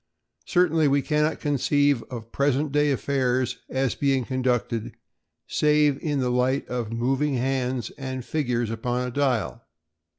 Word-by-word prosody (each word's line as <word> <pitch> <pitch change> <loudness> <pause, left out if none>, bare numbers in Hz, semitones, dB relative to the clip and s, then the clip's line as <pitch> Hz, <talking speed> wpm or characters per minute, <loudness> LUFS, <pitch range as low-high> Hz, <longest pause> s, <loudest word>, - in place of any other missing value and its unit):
Certainly 165 -4 +3
we 140 0 +2
cannot 150 0 +1
conceive 145 -2 +2
of 115 -2 -8
present 140 +1 +1
day 150 +1 +2
affairs 130 -2 0
as 130 -1 0
being 135 -3 +1
conducted 125 -3 -1 0.5
save 150 -2 +2
in 145 -2 -1
the 125 -1 0
light 125 +2 +1
of 120 -3 -3
moving 135 +5 0
hands 130 -1 -1
and 130 -2 -5
figures 120 -7 -1
upon 120 +2 -2
a - - -5
dial. 120 - -1
130 Hz, 135 wpm, -25 LUFS, 125-145 Hz, 0.5 s, Certainly